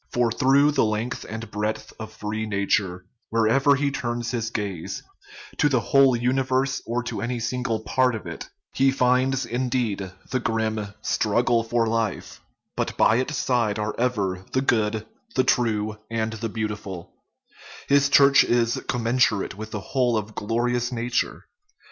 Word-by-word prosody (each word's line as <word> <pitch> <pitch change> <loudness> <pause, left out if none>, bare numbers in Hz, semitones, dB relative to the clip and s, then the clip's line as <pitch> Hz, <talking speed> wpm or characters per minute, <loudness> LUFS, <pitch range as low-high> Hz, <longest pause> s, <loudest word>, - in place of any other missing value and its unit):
For 120 -1 +1
through 140 +4 +4
the 145 - +2
length 110 +3 -2
and 110 -1 -6
breadth 105 +1 -3
of 110 0 -7
free 110 +1 -4
nature, 100 -3 0 0.2
wherever 115 +6 +3
he 140 0 0
turns 120 -2 -3
his 115 -3 -2
gaze, 100 -7 -4 0.6
to 145 - +4
the 130 -3 +2
whole 135 +1 +4
universe 130 +2 0
or 120 +1 -1
to - - -4
any 120 +1 -2
single 115 -1 -2
part 125 +2 +1
of 110 - -7
it, - - -7 0.2
he 135 0 +3
finds, 130 0 +2
indeed, 120 -6 -1 0.2
the 130 - +1
grim 110 -2 -1 0.2
" - - -38
strug 110 +3 +1
gle 115 -1 +3
for 115 0 +1
life," 115 -3 -2 0.3
but - - -2
by 110 - +4
its 130 +3 -1
side 115 -5 +1
are 105 0 -2
ever 100 -7 0
" - - -28
the 130 - +2
good, 110 -4 +1 0.3
the 130 - +4
true, 110 -4 +1
and 110 -1 -2
the 110 +1 -4
beautiful 105 -5 -5 0.4
"; - - -17
his 140 0 +4
church 140 0 +7
is 120 -1 +1
commensurate 115 -3 +1
with 110 +1 -7
the 110 -1 -4
whole 125 +1 +1
of 110 0 -4
glorious 120 +3 -1
nature. 120 0 -2
115 Hz, 165 wpm, -24 LUFS, 110-125 Hz, 0.6 s, church